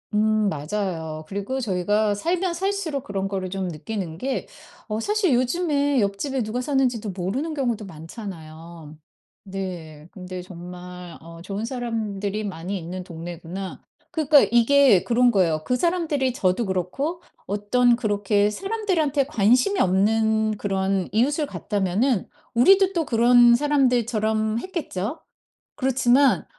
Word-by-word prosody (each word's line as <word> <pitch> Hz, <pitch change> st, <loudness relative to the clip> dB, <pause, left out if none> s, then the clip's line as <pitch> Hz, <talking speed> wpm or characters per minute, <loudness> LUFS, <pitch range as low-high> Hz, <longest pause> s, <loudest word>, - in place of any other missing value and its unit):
음 215 Hz, 0 st, +2 dB
맞아요. 160 Hz, -1 st, -3 dB
그리고 200 Hz, +8 st, -3 dB
저희가 205 Hz, -1 st, +1 dB
살면 345 Hz, -, -1 dB
살수록 370 Hz, -7 st, -2 dB
그런 195 Hz, -1 st, -3 dB
거를 190 Hz, -2 st, -3 dB
좀 190 Hz, 0 st, -3 dB
느끼는 175 Hz, 0 st, -5 dB
게 265 Hz, +7 st, -3 dB, 0.4 s
어 215 Hz, 0 st, -2 dB
사실 405 Hz, -, +1 dB
요즘에 285 Hz, +1 st, +1 dB
옆집에 210 Hz, +7 st, -1 dB
누가 225 Hz, +3 st, -2 dB
사는지도 250 Hz, -6 st, 0 dB
모르는 200 Hz, -, -3 dB
경우도 240 Hz, -7 st, -2 dB
많잖아요. 165 Hz, -3 st, -10 dB, 0.5 s
네. 175 Hz, -6 st, -7 dB
근데 185 Hz, -1 st, -7 dB
정말 180 Hz, -1 st, -10 dB
'어 165 Hz, +1 st, -12 dB
좋은 200 Hz, +3 st, -4 dB
사람들이 215 Hz, -4 st, -3 dB
많이 185 Hz, -1 st, -4 dB
있는 180 Hz, +2 st, -6 dB
동네구나.' 175 Hz, +2 st, -7 dB, 0.3 s
그러니까 310 Hz, -3 st, +5 dB
이게 240 Hz, -3 st, +5 dB
그런 245 Hz, +1 st, +3 dB
거예요. 175 Hz, -8 st, +2 dB
그 250 Hz, -, 0 dB
사람들이 310 Hz, -5 st, 0 dB
저도 190 Hz, +1 st, +1 dB
그렇고 200 Hz, -, -2 dB, 0.2 s
어떤 235 Hz, +5 st, +2 dB
그렇게 205 Hz, -3 st, +1 dB
사람들한테 350 Hz, -, 0 dB
관심이 250 Hz, -, +3 dB
없는 220 Hz, +3 st, +2 dB
그런 195 Hz, -2 st, -1 dB
이웃을 285 Hz, +7 st, +1 dB
갔다면은 205 Hz, -1 st, -1 dB, 0.3 s
우리도 385 Hz, +10 st, +5 dB
또 335 Hz, -3 st, 0 dB
그런 240 Hz, 0 st, +5 dB
사람들처럼 235 Hz, -6 st, +1 dB
했겠죠? 300 Hz, -, -4 dB, 0.6 s
그렇지만 265 Hz, 0 st, +3 dB
215 Hz, 300 characters per minute, -23 LUFS, 185-265 Hz, 0.6 s, 그러니까